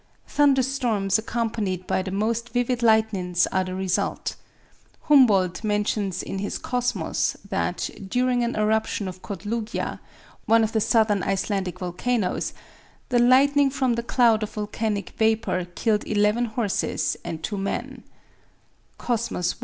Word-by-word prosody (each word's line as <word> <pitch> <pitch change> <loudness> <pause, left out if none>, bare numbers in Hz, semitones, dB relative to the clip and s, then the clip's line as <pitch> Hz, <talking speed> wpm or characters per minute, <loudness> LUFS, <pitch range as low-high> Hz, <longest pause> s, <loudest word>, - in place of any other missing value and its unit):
Thunder 280 -3 +3
storms 225 -7 0
accompanied 220 -5 -2
by - - 0
the 190 - -5
most 225 +4 -1
vivid 245 +1 0
lightnings 215 -6 +2
are 190 0 +1
the 185 0 -5
result. 190 -1 -1 0.7
Humboldt 210 - +4
mentions 205 -3 -1
in 195 - -4
his 205 - -3
"Cosmos" 245 0 -1
that, - - -1 0.2
during 245 +3 +1
an 235 - -1
eruption 215 -1 0
of 185 0 -8
Kotlugja, 215 +3 -4 0.5
one 225 +1 +5
of 220 - 0
the 220 - +1
southern 215 -3 +3
Icelandic 195 0 -1
volcanoes, 185 +4 -1 0.6
the 245 -2 +3
lightning 275 +3 +5
from 265 -2 0
the 235 - -1
cloud 235 -2 +3
of 215 - -4
volcanic 210 -1 -3
vapor 220 -5 +1
killed 215 -2 0
eleven 210 +3 +2
horses 220 -3 -1
and 165 -2 -6
two 205 +2 -3
men 195 - -4 0.9
(Cosmos 235 -7 -1
i. - - -21
220 Hz, 135 wpm, -24 LUFS, 195-240 Hz, 0.9 s, one